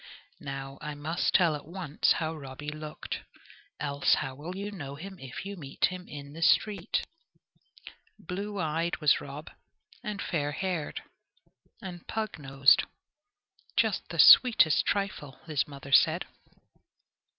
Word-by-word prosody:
Now 135 0 -6
I 150 -1 -5
must 155 +4 -1
tell 170 -5 +4
at 145 - -9
once 170 -4 +1
how 160 0 -2
Robby 145 0 -7
looked, 155 0 -6 0.6
else 140 -1 +2
how 135 - -3
will 155 +7 -7
you 200 +2 -4
know 140 -8 -7
him 190 +5 -9
if 135 +7 -8
you 200 +1 -5
meet 140 -7 -1
him 185 -1 -5
in 145 -1 -9
the 165 - -9
street? 190 +2 +2 1.1
Blue 200 +3 -5
eyed 165 +1 -1
was 150 -3 +3
Rob, 145 +2 -8 0.5
and 210 -3 -4
fair 145 -6 -2
haired, 180 -3 -3 0.8
and 175 -3 -8
pug 220 -6 -3
nosed, 135 -1 +4 0.9
just - - +1
the - - -6
sweetest 225 - +7
trifle, 195 -9 -2
his 155 -4 0
mother 140 -1 -10
said. - - +5
155 Hz, 135 wpm, -29 LUFS, 145-185 Hz, 1.1 s, sweetest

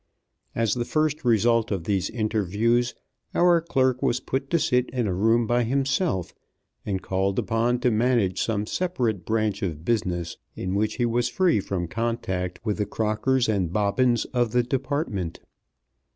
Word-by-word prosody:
As 115 -3 +1
the 120 - -1
first 155 +3 0
result 115 -1 +3
of 95 -5 -2
these 95 +1 0
interviews 110 +2 0 0.4
our 175 -1 +5
clerk 130 -6 +1
was 120 - +1
put 135 +1 -3
to 170 - +3
sit 125 -5 +1
in 125 -2 -1
a 95 - 0
room 115 +5 +3
by 120 +2 +2
himself, 135 - 0 0.5
and 95 -2 -3
called 95 +1 -1
upon 120 +2 +1
to 125 - +3
manage 110 -4 +1
some 105 -2 -1
separate 120 - -2
branch 110 -2 0
of 80 -4 -4
business 90 -7 -1 0.2
in 95 0 -3
which 105 +2 0
he 120 - +1
was 120 +1 +1
free 180 - +2
from 95 -3 -3
contact 95 -3 -2
with 105 -2 0
the 105 - 0
Crockers 115 +4 0
and 95 -6 0
Bobbins 110 +5 +2
of 120 -2 +1
the 125 0 +3
Department. 130 - -2
115 Hz, 160 wpm, -25 LUFS, 100-125 Hz, 0.5 s, our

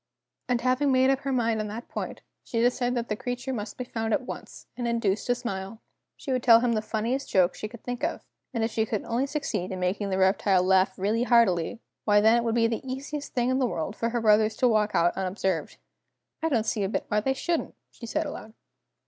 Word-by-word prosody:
And 245 -1 +1
having 255 +3 +2
made 260 +1 +4
up 270 - +1
her 275 0 -3
mind 230 -3 +1
on 215 - -2
that 220 +3 -7
point, - - -5 0.2
she 230 - -3
decided 245 +1 +1
that 235 -1 -2
the 210 - -1
creature 245 +3 -4
must 210 -3 -5
be 250 - -3
found 225 -2 -2
at 280 - -3
once, - - -8
and 240 -1 -3
induced 225 -4 0
to 245 - +3
smile! 220 -3 -5 0.4
She 275 - -5
would 255 -1 +1
tell 230 -2 +7
him 240 -1 +2
the 215 - 0
funniest 230 +5 -2
joke 180 -2 +3
she 215 - -5
could 230 +1 -13
think 245 +2 -5
of, 330 - -2 0.3
and 230 -4 -1
if 225 - 0
she 220 - +1
could 215 -2 -2
only 245 +4 -1
succeed 245 - -3
in 185 - -4
making 190 +3 -1
the 190 - 0
reptile 190 0 +3
laugh 190 0 +3
really 210 +5 0
heartily, 230 -5 +3 0.2
why 205 -1 +5
then 220 +2 +5
it 235 - +1
would 230 -1 0
be 230 -1 +3
the 230 0 -1
easiest 275 +3 -6
thing 245 0 +2
in 260 - +1
the 255 - +2
world 190 -1 -3
for 230 - -1
her 240 0 -1
brothers 215 0 +4
to 255 - +3
walk 215 -2 +2
out 170 +1 +3
unobserved. 190 -3 -2 0.6
"I 325 - +1
don't 230 -7 +1
see 215 - -1
a 190 - 0
bit - - -2
why 210 - +2
they 265 +5 0
shouldn't," 335 +4 -2 0.2
she 235 - -10
said 310 +7 -1
aloud. 220 -6 -8
230 Hz, 240 wpm, -27 LUFS, 210-250 Hz, 0.6 s, tell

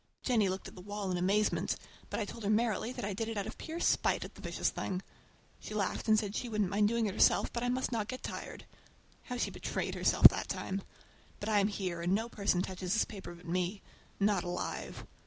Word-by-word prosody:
Jennie 220 -6 +3
looked 190 0 -3
at - - -10
the 180 - -10
wall 205 0 -3
in 180 - 0
amazement, 200 +4 +2 0.3
but - - -2
I 215 - 0
told 230 +2 -8
her 200 - 0
merrily 220 +1 +2
that 255 - -4
I 205 - -2
did 220 +3 -2
it 225 - -4
out 200 - -1
of - - -7
pure 325 +1 -5
spite - - +2
at - - -10
the - - -13
vicious - - 0
thing. 185 0 -3 0.6
She 215 - -7
laughed 205 +2 -1
and 215 0 +6
said 210 -1 -1
she 245 - -2
wouldn't 210 -4 0
mind 205 +1 +4
doing 230 +1 +1
it 200 - -1
herself, - - +4
but 235 - -1
I 245 - 0
must 255 +1 0
not 220 -3 -1
get 255 +1 -6
tired. - - -6 0.6
How 250 - -4
she - - 0
betrayed - - -3
herself - - +8
that - - -4
time! 195 +1 -2 0.6
But 205 - -3
I 210 -1 +4
am 200 - +3
here, 185 -5 -3
and 175 +3 +2
no 225 +3 -1
person 200 -5 +1
touches 185 -1 -3
this 220 - +3
paper 190 -4 -8
but 175 - -15
me—not 185 +2 -1
alive! 175 0 -4
205 Hz, 230 wpm, -33 LUFS, 190-225 Hz, 0.6 s, herself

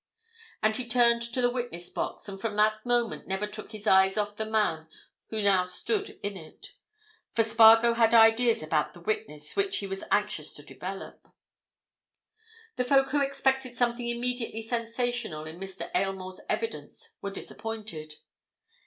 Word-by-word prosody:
And 215 0 +3
he 250 -2 -4
turned 235 -1 +4
to 235 +2 +1
the 245 - +3
witness 240 -9 -4
box - - -3
and 195 -1 -7
from 215 -1 -2
that 215 +1 +2
moment 240 -2 0
never 190 +2 -1
took 215 +1 -7
his 215 -1 -9
eyes 190 0 +5
off 205 0 -1
the 220 +1 -3
man 205 -8 0 0.4
who 220 -1 -2
now 190 -2 +4
stood 410 - -2
in 205 0 -3
it. 160 -4 -11 0.6
For 225 - +4
Spargo 225 +1 +7
had 230 -1 +3
ideas 225 -2 +5
about 155 -1 0
the - - -11
witness 170 -6 -4
which 395 -1 +1
he 200 - -4
was 195 0 -5
anxious 210 -7 0
to 145 - -8
develop. 190 +6 -8 1.5
The 250 - +2
folk 270 +1 +3
who 290 +1 +1
expected 265 -2 0
something 240 0 0
immediately 235 -1 -2
sensational 230 -7 -2
in 160 +2 -9
Mr. 190 0 -7
Aylmore's 185 0 -2
evidence 460 0 -4
were 200 - -3
disappointed. 210 -7 -6
220 Hz, 155 wpm, -28 LUFS, 195-240 Hz, 1.5 s, Spargo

